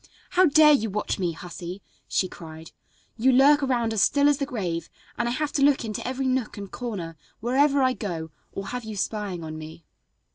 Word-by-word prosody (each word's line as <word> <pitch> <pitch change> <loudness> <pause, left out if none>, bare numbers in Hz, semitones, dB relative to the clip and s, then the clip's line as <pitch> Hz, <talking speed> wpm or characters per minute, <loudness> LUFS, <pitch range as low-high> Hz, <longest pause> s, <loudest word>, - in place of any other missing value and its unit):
"How 365 0 +5
dare 300 0 +7
you 225 -6 +1
watch 210 +1 -2
me, 175 -3 0
hussy?" 180 +2 -8 0.2
she 185 - +1
cried. 160 -2 -11 0.5
"You 255 +4 +4
lurk 280 +3 +6
around 240 -4 0
as 215 - +1
still 285 +10 +4
as 290 -1 +3
the 275 - -1
grave, 180 - -3 0.3
and 240 0 -1
I - - -1
have 295 +4 -1
to 280 - -1
look 275 -3 +4
into 215 +1 -4
every 260 +1 -2
nook 255 -4 -1
and 200 -1 -7
corner, 195 -10 -5 0.2
wherever 275 +4 +3
I 255 0 +3
go, 170 -7 -5 0.2
or 195 0 -6
have 250 0 -4
you 220 -1 -6
spying 195 -2 -3
on 155 0 -6
me." 155 +1 -10
225 Hz, 205 wpm, -25 LUFS, 180-270 Hz, 0.5 s, dare